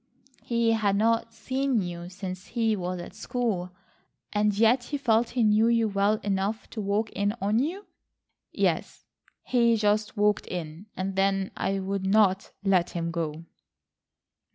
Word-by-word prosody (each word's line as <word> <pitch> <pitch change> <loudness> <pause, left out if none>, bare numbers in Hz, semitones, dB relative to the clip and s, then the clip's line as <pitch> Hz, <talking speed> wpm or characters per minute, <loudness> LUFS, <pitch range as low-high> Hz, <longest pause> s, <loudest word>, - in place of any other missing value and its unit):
"He 235 -1 +1
had 210 -3 +2
not 230 +2 +1
seen 260 +2 -1
you 175 0 -6
since 185 0 -7
he 225 -2 +1
was 180 -1 -3
at 175 - -8
school, 210 -8 -2 0.6
and 210 0 +3
yet 235 +3 +4
he 290 - -3
felt 235 -3 +2
he 240 - +4
knew 215 +1 +4
you 230 -1 +3
well 200 +1 +2
enough 200 +2 -1
to 220 - -4
walk 205 +2 -1
in 205 +2 -1
on 210 +2 +1
you!" 355 +10 -2 0.7
"Yes, - - -1 0.4
he 235 -2 +3
just 210 +1 +1
walked 210 0 +2
in, 170 +2 -6
and 190 +1 -3
then 195 0 +1
I 195 0 -1
would 195 0 -3
not 195 -1 +3
let 185 -3 +3
him 170 -1 -3
go." 165 -1 -4
210 Hz, 155 wpm, -27 LUFS, 190-225 Hz, 0.7 s, yet